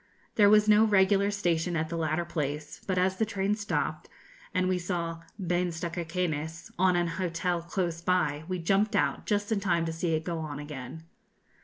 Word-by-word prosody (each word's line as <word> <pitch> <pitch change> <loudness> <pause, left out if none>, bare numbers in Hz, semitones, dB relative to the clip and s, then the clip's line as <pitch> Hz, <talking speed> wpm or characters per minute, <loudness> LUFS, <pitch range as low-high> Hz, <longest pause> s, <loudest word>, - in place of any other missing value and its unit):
There 205 -2 +6
was 210 0 +6
no 215 +1 +6
regular 200 -1 +4
station 175 -4 0
at 160 0 -1
the 170 - -3
latter 160 +1 0
place, 150 -2 -4
but 185 -2 0
as 185 +1 +2
the 220 - +2
train 205 -2 0
stopped, 210 -1 -2 0.4
and 185 -1 +1
we 185 -1 +1
saw 170 -2 -3 0.2
'Bains 175 -2 -1
de 170 0 -3
Cauquenes' 165 -2 -3
on 185 -1 +4
an 175 0 +2 0.2
hotel 175 0 -1
close 170 -1 -2
by, 170 -4 +1
we 185 0 -2
jumped 195 +5 +1
out - - 0
just 205 0 0
in 215 - +2
time 170 -4 +1
to 165 - -2
see 165 0 0
it 155 - -2
go 170 -1 -3
on 150 -2 -5
again. 145 +1 -7
175 Hz, 190 wpm, -29 LUFS, 165-195 Hz, 0.4 s, There